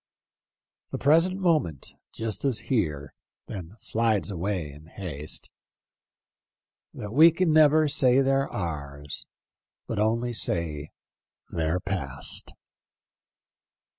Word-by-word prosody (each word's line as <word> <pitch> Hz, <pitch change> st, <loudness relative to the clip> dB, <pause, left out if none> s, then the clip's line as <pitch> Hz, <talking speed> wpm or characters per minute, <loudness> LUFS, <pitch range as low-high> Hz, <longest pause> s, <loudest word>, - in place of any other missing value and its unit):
The -, -, -4 dB
present 165 Hz, +7 st, +3 dB
moment 155 Hz, -, +1 dB, 0.2 s
just 110 Hz, -1 st, -3 dB
is 135 Hz, -5 st, +2 dB
here, 75 Hz, -, 0 dB, 0.3 s
Then 95 Hz, -1 st, -8 dB
slides 110 Hz, -2 st, 0 dB
away 90 Hz, -4 st, -2 dB
in 75 Hz, +3 st, -14 dB
haste, 80 Hz, -5 st, -5 dB, 1.4 s
That 105 Hz, +1 st, -7 dB
we 160 Hz, +5 st, +8 dB
can 165 Hz, -1 st, +1 dB
never 155 Hz, 0 st, +6 dB
say 130 Hz, -2 st, +4 dB
they're 135 Hz, 0 st, +1 dB
ours. 70 Hz, -5 st, -5 dB, 0.6 s
But 110 Hz, -, -3 dB
only 115 Hz, +3 st, +1 dB
say 80 Hz, -7 st, -1 dB, 0.6 s
they're 80 Hz, +2 st, 0 dB
past." 70 Hz, -9 st, -2 dB
105 Hz, 100 wpm, -26 LUFS, -, 1.4 s, we